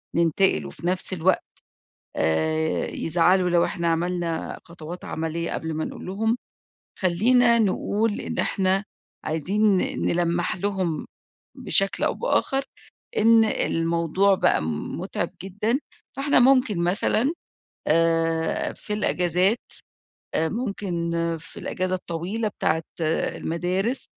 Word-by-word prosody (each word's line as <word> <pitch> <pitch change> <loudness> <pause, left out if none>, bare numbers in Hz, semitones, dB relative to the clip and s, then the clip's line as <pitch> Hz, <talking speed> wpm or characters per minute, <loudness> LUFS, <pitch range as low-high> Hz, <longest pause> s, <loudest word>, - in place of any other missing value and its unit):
ننتقل، 170 - +2
وفي 75 - -6
نفس 185 +1 +1
الوقت، 185 +1 +2 0.7
آآ 155 - +1
يزعلوا 180 +2 +2
لو 170 -1 +4
إحنا 170 0 -1
عملنا 170 0 -1
خطوات 170 0 -9
عملية 165 +1 -3
قبل 160 -1 -3
ما 155 - -2
نقول - - -7
لهم. 220 +5 0 0.6
خلّينا 235 +6 +4
نقول 210 +1 0
إن - - -4
إحنا 190 0 +1 0.4
عايزين 195 +6 +2
ن - - -1
نلمّح 175 0 0
لهم 185 -5 -2 0.5
بشكل 195 0 +2
أو - - +2
بآخر 275 - 0 0.5
إن 225 +1 +6
الموضوع 170 +1 +1
بقى - - +2 0.4
مُتعِب - - -3
جدًا. 210 +7 -1 0.4
فإحنا 280 0 +3
ممكن 245 -8 +4
مثلًا، 215 - +2 0.5
آآ 165 0 +1
في 210 - -6
الإجازات 180 +1 +2 0.8
آآ 160 0 +2
ممكن 195 -7 -3 0.3
في 165 - -10
الإجازة 185 0 -1
الطويلة 185 +6 -3
بتاعة 160 -5 -1 0.2
المدارس، 180 +7 0
180 Hz, 110 wpm, -24 LUFS, 165-210 Hz, 0.8 s, إن